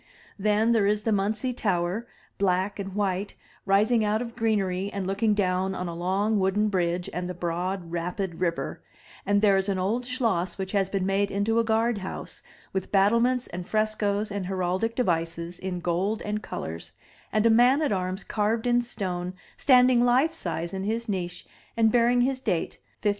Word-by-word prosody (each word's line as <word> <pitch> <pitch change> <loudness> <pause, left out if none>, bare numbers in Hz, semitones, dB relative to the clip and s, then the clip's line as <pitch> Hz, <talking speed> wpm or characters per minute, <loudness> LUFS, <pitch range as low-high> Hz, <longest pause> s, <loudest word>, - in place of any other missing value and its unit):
Then 210 +3 +2
there 220 -4 +3
is 210 0 +1
the 225 - +1
Muntze 215 +5 0
Tower, 190 +1 -1 0.3
black 190 +1 +1
and 195 -1 -5
white, 200 -1 -1 0.3
rising 215 +4 +3
out 210 +1 +1
of 235 -1 -6
greenery 200 -4 0
and 200 -2 -3
looking 205 +3 +1
down 190 -1 0
on 180 -1 -3
a 170 - -4
long 195 +5 0
wooden 200 +3 +2
bridge 175 -2 0
and 180 0 -3
the 180 - -5
broad 175 +1 -3
rapid 175 +1 -3
river; 170 -2 -2 0.5
and 205 +1 +2
there 200 -2 +5
is 195 +1 0
an 195 - 0
old 220 +7 -1
schloss 220 -9 0
which 190 -1 -4
has 195 -2 +1
been 195 -2 -1
made 195 +1 +1
into 205 +4 +1
a - - +3
guard 225 0 +1
house, 190 - -6 0.3
with 190 -1 -3
battlements 235 +5 +3
and 175 0 -7
frescoes 215 -1 0
and 200 -2 -3
heraldic 190 +4 -1
devices 170 -5 -1
in 185 -1 -4
gold 185 +6 -1
and 210 0 -2
colors, 80 - -6 0.4
and 215 +1 +2
a 230 - +6
man 245 +5 +5
at 295 - +1
arms 185 0 -2
carved 220 +2 0
in 245 0 +3
stone 185 -6 -4 0.2
standing 250 -2 +5
life 255 +7 +3
size 170 - -4
in 190 0 -3
his 225 +3 -2
niche 180 -4 -3 0.3
and 225 -1 +4
bearing 245 +1 +4
his 260 +1 +1
date 190 -10 -2 0.2
1530. 210 - +3
200 Hz, 180 wpm, -26 LUFS, 185-225 Hz, 0.5 s, a